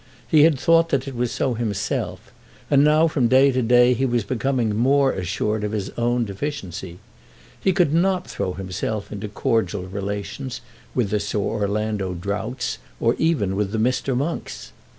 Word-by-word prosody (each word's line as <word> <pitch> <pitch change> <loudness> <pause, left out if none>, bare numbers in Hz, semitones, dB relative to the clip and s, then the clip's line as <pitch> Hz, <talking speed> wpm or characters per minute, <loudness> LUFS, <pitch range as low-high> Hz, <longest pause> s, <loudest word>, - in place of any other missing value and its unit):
He 150 -1 +6
had 155 -5 +3
thought 165 +2 +4
that 135 -2 0
it 135 - -5
was 120 0 -1
so 130 - 0
himself, 105 -3 -3 0.4
and 140 0 +6
now 155 +2 +5
from 140 -6 +1
day 135 +3 +5
to 130 0 0
day 125 +1 +5
he 125 +2 -1
was 120 -2 0
becoming 120 -1 0
more 135 +4 +3
assured 105 +4 -2
of 105 0 -2
his 105 -3 -3
own 120 0 0
deficiency. 100 - -5 0.6
He 190 - +2
could 175 -6 +2
not 180 +2 +2
throw 90 - -3
himself 95 +3 -4
into 105 0 -5
cordial 105 -1 -1
relations 100 +7 -5 0.3
with 115 -6 0
the 105 - +1
Sir 105 - -3
Orlando 105 -2 -1
Droughts, 105 +7 -3 0.2
or 115 - +3
even 120 - +1
with 100 -1 -1
the - - 0
Mr. 125 +3 0
Monks. 150 +6 -4
120 Hz, 170 wpm, -22 LUFS, 105-135 Hz, 0.6 s, He